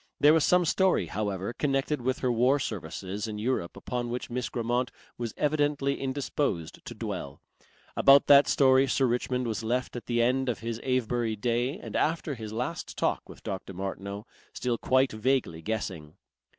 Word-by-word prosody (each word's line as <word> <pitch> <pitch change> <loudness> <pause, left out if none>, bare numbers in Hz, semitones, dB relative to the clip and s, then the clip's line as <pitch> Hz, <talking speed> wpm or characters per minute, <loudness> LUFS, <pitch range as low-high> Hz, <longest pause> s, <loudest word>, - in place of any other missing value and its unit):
There 150 +1 +7
was 160 -2 +4
some 180 -1 +4
story, 185 - +2
however, 100 +3 -3
connected 135 +1 0
with 130 +2 0
her 125 - +2
war 125 +4 +3
services 100 - -4
in 105 -1 -5
Europe 105 -6 -2
upon 120 -1 -3
which 125 0 -4
Miss 125 -1 -2
Grammont 120 +1 -1 0.3
was 120 -2 -4
evidently 145 -2 +1
indisposed 135 - -2
to - - -7
dwell. - - -5 0.6
About 140 0 +6
that 140 0 +7
story 135 0 +4
Sir 135 +1 +2
Richmond 125 +1 0
was 115 -1 -2
left 125 +3 -1
at 120 - -7
the 120 -1 0
end 130 +2 +2
of 115 - -1
his 115 0 -4
Avebury 120 -3 0
day 120 - 0
and 215 - -8
after 160 -1 0
his 110 -4 -7
last 125 +9 -4
talk - - -1
with - - -13
Dr. 95 -1 -5
Martineau, 100 +2 -5 0.3
still 120 -2 -1
quite 130 +1 +3
vaguely 110 -7 0
guessing. 90 -7 -4
125 Hz, 170 wpm, -28 LUFS, 110-135 Hz, 0.6 s, There